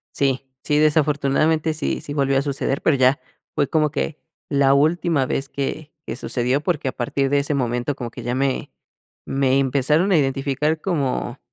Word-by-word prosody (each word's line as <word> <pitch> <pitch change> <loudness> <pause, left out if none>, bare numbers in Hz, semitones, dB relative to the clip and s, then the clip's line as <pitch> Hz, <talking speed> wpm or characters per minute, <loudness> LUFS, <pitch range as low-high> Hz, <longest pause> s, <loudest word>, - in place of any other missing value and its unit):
Sí, 135 -1 0
sí, 150 - +2
desafortunadamente 155 +1 +2
sí, 155 - -2
sí 145 - -7
volvió 135 -2 +2
a 135 - +1
suceder, 140 -1 -2
pero 150 -4 +3
ya 130 +1 +3 0.3
fue 145 -3 +1
como 155 -2 +2
que 145 +1 -3 0.3
la 140 -1 +3
última 155 -1 +2
vez 135 +2 -2
que 145 +2 -4
que - - -4
sucedió, 130 +3 -1
porque 155 -6 -1
a - - -3
partir 135 +3 -1
de 145 +1 +2
ese 140 +1 -2
momento 125 0 -1
como 120 -2 -6
que 120 - -9
ya 120 +1 -2
me 135 0 -1 0.6
me 135 0 +2
empezaron 145 +8 +2
a - - +6
identificar 140 +3 0
como 140 -7 -2
140 Hz, 175 wpm, -22 LUFS, 135-150 Hz, 0.6 s, a